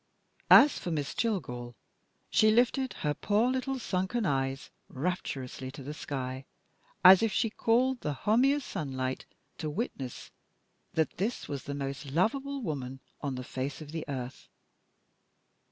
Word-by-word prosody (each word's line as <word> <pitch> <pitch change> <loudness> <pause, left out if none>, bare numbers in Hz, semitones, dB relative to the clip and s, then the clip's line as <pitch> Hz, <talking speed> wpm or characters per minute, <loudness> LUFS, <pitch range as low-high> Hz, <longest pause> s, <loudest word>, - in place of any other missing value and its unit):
As 290 - +8
for - - -4
Miss 150 -4 -2
Jillgall, 125 - -2 0.6
she 215 - +5
lifted 245 +4 +2
her 150 - +2
poor 215 +9 +2
little 260 +1 -1
sunken 195 0 -1
eyes 135 -3 -1 0.2
rapturously 135 -4 -3
to 135 +1 -9
the 145 +3 -5
sky, 130 -3 -5 0.6
as 185 0 +10
if 225 -2 +2
she 220 +2 +1
called 245 +3 +2
the 150 - -1
homiest 260 +6 +3
sunlight 130 -3 -3 0.3
to 155 - -2
witness 145 - -5 0.6
that 160 -1 0
this 215 +7 -2
was 140 -3 -5
the 140 - -4
most 140 +1 -4
lovable 265 - 0
woman 135 - -4 0.2
on 140 -3 -2
the 125 - -5
face 130 +1 -4
of 150 -2 -9
the 160 0 -4
earth. 130 -3 -6
155 Hz, 140 wpm, -30 LUFS, -, 0.6 s, as